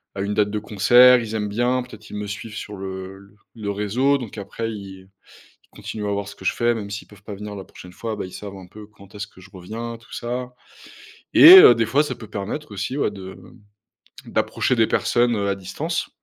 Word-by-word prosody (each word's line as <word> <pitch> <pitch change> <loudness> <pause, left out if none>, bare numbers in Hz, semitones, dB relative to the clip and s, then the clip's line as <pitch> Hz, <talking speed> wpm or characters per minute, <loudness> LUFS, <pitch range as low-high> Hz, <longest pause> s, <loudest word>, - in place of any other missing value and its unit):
à 95 - -3
une 100 +1 -2
date 105 -1 +2
de 105 - -2
concert, 120 +5 +6
ils 110 -1 -5
aiment 105 -1 -2
bien, 120 +4 0
peut-être 110 -3 -13
qu'ils 110 - -10
me 105 0 -4
suivent 105 +2 -7
sur 105 -1 -7
le 95 +1 -8 0.2
le 110 -3 -6
réseau, 115 +8 +1
donc 120 -5 -8
après 115 +3 -5
ils 95 -3 -10 0.6
ils - - -17
continuent 105 -2 -5
à - - -1
voir 100 0 -3
ce 100 - -11
que - - -12
je - - +2
fais, 120 0 +1
même 105 -3 -6
s'ils 100 +1 -7
peuvent 105 -1 -18
pas 105 0 -7
venir 105 +1 -8
la 95 -1 -8
prochaine 90 - -13
fois, 110 +3 -5
bah, 105 - -5
ils 90 - -10
savent 100 +1 -8
un 95 -1 -12
peu 105 +3 -13
quand 100 -2 -19
est-ce 105 0 -5
que 95 - -18
je - - -15
reviens, 115 +6 -7
tout 115 - -18
ça. 125 +1 -4 0.8
Et 360 +4 +11
heu, 120 - +9
des 115 0 +1
fois, 140 +6 +3
ça 150 - -4
peut 110 - -12
permettre 105 +7 -5
aussi, 105 +7 -4
ouais, 140 - +1
de 95 -2 -10 0.9
d'approcher 130 - 0
des 115 - +4
personnes, 120 +1 +1
heu, 100 -1 -1
à 100 - +1
distance 120 - -4
105 Hz, 235 wpm, -22 LUFS, 100-115 Hz, 0.9 s, Et